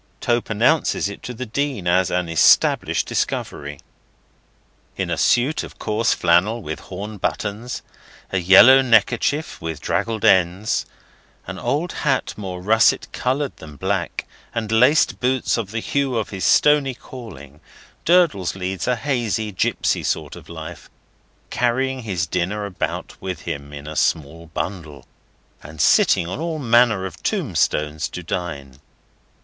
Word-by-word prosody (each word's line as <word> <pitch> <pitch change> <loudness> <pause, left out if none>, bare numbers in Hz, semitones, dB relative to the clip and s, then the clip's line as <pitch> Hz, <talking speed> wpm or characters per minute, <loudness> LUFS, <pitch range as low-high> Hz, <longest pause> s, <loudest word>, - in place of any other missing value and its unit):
Tope 120 0 0
announces 120 +4 +2
it 100 - -9
to - - -6
the 125 +1 -6
Dean 130 -3 -2
as 90 +1 +2
an 90 -1 -1
established 80 -1 +3
discovery. 70 0 -3 1.2
In - - -2
a - - +1
suit 125 +6 +2
of - - -10
coarse 110 +2 0
flannel 95 +7 +2
with 80 -1 -5
horn 105 +3 -7
buttons, 105 +5 -3 0.5
a 95 - +1
yellow 100 +9 +8
neckerchief 120 +4 +1
with 80 -2 -4
draggled 110 +5 -1
ends, 95 +3 +2 0.6
an - - -7
old 155 +5 -1
hat 135 -4 -1
more 90 -3 -6
russet 110 +3 +3
coloured 130 +3 -2
than 75 -2 -11
black, 95 +2 -2 0.3
and 110 -2 -2
laced 125 +7 +4
boots 130 +1 +1
of 115 -5 -3
the 110 +2 -3
hue 135 -2 -1
of 110 - -3
his 95 -2 -3
stony 145 -3 +4
calling, 85 - -11 0.4
Durdles 165 - +3
leads 95 -2 -4
a 125 - +2
hazy, 115 -4 -2
gipsy 90 - 0
sort - - -2
of - - -13
life, - - -9 0.6
carrying 130 +2 0
his 95 -7 -2
dinner 95 +4 -2
about 95 -3 -5
with 95 -1 -5
him 70 0 -6
in 70 0 -9
a 75 0 -7
small 80 +3 -1
bundle, 80 -3 -6 0.6
and 75 +1 -12
sitting 85 - +4
on 90 - -5
all 165 0 -3
manner 120 -6 +3
of 90 -4 -8
tombstones 80 - -1
to 90 - -7
dine. 75 -7 -5
105 Hz, 145 wpm, -21 LUFS, 85-125 Hz, 1.2 s, yellow